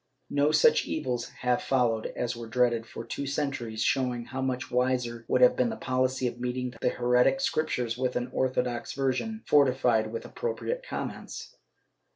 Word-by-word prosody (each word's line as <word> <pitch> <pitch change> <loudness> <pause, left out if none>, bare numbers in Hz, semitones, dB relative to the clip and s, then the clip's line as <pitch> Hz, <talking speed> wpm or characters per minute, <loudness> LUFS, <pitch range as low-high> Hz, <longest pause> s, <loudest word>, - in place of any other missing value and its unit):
No 145 +1 +3
such 465 - +5
evils 125 - -2
have 125 -1 0
followed 120 -4 +1
as 120 -1 -2
were 115 -1 -7
dreaded 120 0 +1
for 115 - -8
two 140 - -4
centuries, 135 -6 -2
showing 125 -3 0
how 130 +2 -5
much 130 0 -2
wiser 125 -2 0
would 125 - +2
have 125 - +7
been 125 -2 +2
the - - -3
policy 130 0 0
of 120 0 -2
meeting 125 0 -3
the - - +3
heretic 125 - +3
Scriptures 140 - -1
with 130 -1 0
an 125 0 -2
orthodox 125 -2 -1
version, 135 - -1
fortified 125 -6 +3
with 115 - -5
appropriate 480 +1 -3
comments. - - -6
125 Hz, 165 wpm, -28 LUFS, 120-135 Hz, -, have